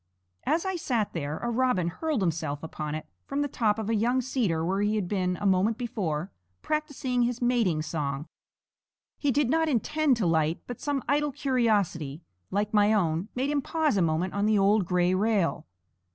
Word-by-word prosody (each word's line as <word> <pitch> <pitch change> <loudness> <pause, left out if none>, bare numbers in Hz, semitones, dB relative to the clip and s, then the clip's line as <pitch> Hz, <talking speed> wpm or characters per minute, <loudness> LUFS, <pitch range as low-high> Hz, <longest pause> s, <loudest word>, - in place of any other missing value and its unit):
As 330 +4 +1
I 380 -1 -1
sat 235 -10 -1
there 150 -2 -3
a 240 - 0
robin 235 -8 +1
hurled 295 - -1
himself 155 -4 -2
upon 155 -1 -4
it 155 - -5 0.2
from 280 +1 -1
the - - -1
top 220 -6 +1
of 220 -2 -3
a 225 - +1
young 235 +4 +2
cedar 230 -11 0
where 190 +3 0
he 210 +1 +1
had 205 -4 -1
been, 180 -2 0
a - - -5
moment 195 +3 +3
before, 190 - -3 0.3
practising 290 -5 -1
his 240 0 0
mating 230 -11 +1
song. 150 -2 -3 0.9
He 290 - +1
did 270 -1 +2
not 320 0 +2
intend 290 +1 +2
to 215 - 0
light, 160 -1 +2
but 245 - -7
some 285 -3 -1
idle 295 +1 +1
curiosity, 205 - 0 0.3
like 205 +2 -1
my 210 0 +5
own, 170 -2 +1
made 265 +3 0
him 290 -1 +1
pause 315 -1 0
a 195 - +2
moment 165 +2 0
on 200 +1 +1
the 215 -1 +3
old 200 0 +3
gray 180 0 +2
rail. 200 -2 +1
210 Hz, 190 wpm, -27 LUFS, 175-255 Hz, 0.9 s, my